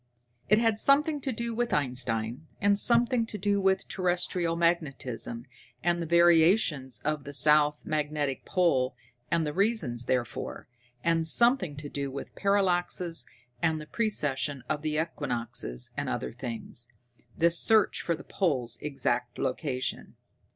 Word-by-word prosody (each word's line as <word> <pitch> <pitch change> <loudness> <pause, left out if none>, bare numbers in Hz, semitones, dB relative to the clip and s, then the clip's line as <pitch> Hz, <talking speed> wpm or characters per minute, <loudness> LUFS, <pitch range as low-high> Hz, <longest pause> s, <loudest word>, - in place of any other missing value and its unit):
It 210 - +6
had 225 -1 +2
something 290 +3 +3
to 265 - -2
do 235 0 -3
with 240 +1 -1
Einstein, 125 0 -1
and 200 0 +3
something 240 +2 +4
to 210 - -5
do 200 0 +1
with 190 0 +1
terrestrial 175 -2 0
magnetism, 140 -8 -1 0.4
and 175 0 +1
the 165 - -3
variations 170 - +3
of 150 -1 -1
the 145 0 -8
south 150 +1 +3
magnetic 150 -3 -2
pole, 135 -9 +1 0.3
and 165 -1 +1
the 150 - -3
reason 200 - +1
therefore, 125 -4 -3 0.4
and 165 -1 +2
something 235 - +3
to 145 0 -6
do 140 -1 -4
with 140 +1 -7
parallaxes 180 -6 0 0.3
and 160 -1 +1
the 155 - -8
precession 145 - -1
of 145 - -2
the 155 0 -1
equinoxes 120 - -3
and - - -2
other 60 - -3
things, 120 -1 -5 0.5
this 170 0 +4
search 220 -2 +3
for 170 - -1
the - - -11
pole's 130 - -1
exact 125 -4 -2
location. 130 -1 -3
160 Hz, 140 wpm, -28 LUFS, 135-190 Hz, 0.5 s, It